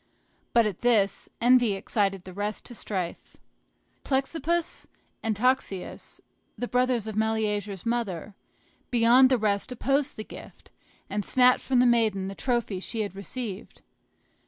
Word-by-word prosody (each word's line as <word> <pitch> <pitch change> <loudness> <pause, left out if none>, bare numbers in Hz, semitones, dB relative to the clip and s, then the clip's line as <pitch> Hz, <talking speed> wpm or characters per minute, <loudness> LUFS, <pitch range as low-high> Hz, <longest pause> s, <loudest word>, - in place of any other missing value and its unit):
But 235 -1 +5
at 205 -4 -3
this, 215 -5 +2
envy 245 -2 +5
excited 195 -1 -1
the 185 - -10
rest 205 +2 -4
to - - -9
strife. 185 -6 -5 0.7
Plexippus 315 +5 -1 0.3
and 220 -1 -1
Toxeus, 245 -5 -1 0.4
the 245 - -3
brothers 250 -3 +1
of 220 -2 -5
Meleager's 210 -3 -1
mother, 215 -5 -2 0.6
beyond 245 +2 +6
the 260 - +3
rest 210 +1 0
opposed 275 +3 0
the 215 - -4
gift, - - -13 0.4
and 205 0 -2
snatched 250 +2 +4
from 260 - +1
the 250 - +5
maiden 220 -5 +2
the - - -6
trophy 235 -4 -1
she 220 +4 -4
had 205 -2 -4
received. 200 0 -7
225 Hz, 135 wpm, -27 LUFS, 200-250 Hz, 0.7 s, beyond